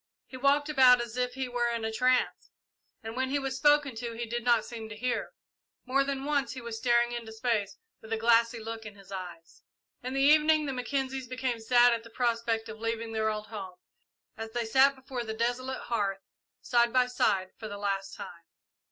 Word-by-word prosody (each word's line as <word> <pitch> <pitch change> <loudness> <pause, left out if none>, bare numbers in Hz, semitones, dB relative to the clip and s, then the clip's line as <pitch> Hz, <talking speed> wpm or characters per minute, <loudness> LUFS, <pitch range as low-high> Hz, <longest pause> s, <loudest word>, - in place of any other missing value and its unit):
He - - -12
walked 280 +3 +2
about 260 -4 +6
as 235 -1 -5
if 250 0 -1
he 265 -1 -2
were 245 -1 0
in 230 -1 -2
a 220 - -1
trance, 255 +3 +1 0.5
and 225 +1 -6
when 260 +1 -1
he 280 - +1
was 270 -2 -3
spoken 290 -1 +3
to 235 0 -4
he 235 +1 -4
did 235 +1 -4
not 235 -2 +3
seem 225 -2 -8
to 220 - -7
hear. 250 +2 -2 0.5
More 270 +2 +2
than 275 0 -3
once 285 -2 0
he 260 - -7
was 235 -1 -6
seen - - -10
staring 240 -1 +3
into 235 -2 -6
space 220 -3 -1 0.2
with 220 - -13
a 225 - +1
glassy 230 +1 +3
look 225 0 -6
in 210 -2 -9
his 195 -1 -16
eyes. 175 -3 -8 0.4
In 255 +2 -5
the 270 - +1
evening 305 +1 +5
the 275 - -2
Mackenzies 265 0 -3
became 255 -1 -2
sad 240 +1 +5
at 230 -1 -3
the 230 - -13
prospect 230 -1 -1
of 220 0 -9
leaving 230 0 -3
their 220 -1 0
old 215 0 -3
home, 195 -5 -8 0.6
as 225 0 -6
they 240 -1 -1
sat 265 +5 +4
before 260 -2 -6
the 220 -1 -5
desolate 245 +3 -2
hearth, 200 -4 -2 0.4
side 235 -1 +2
by 255 0 +4
side, 195 -6 0
for 220 - -6
the 205 -1 -6
last 195 -1 -2
time. 170 -1 -10
235 Hz, 215 wpm, -29 LUFS, 220-260 Hz, 0.6 s, about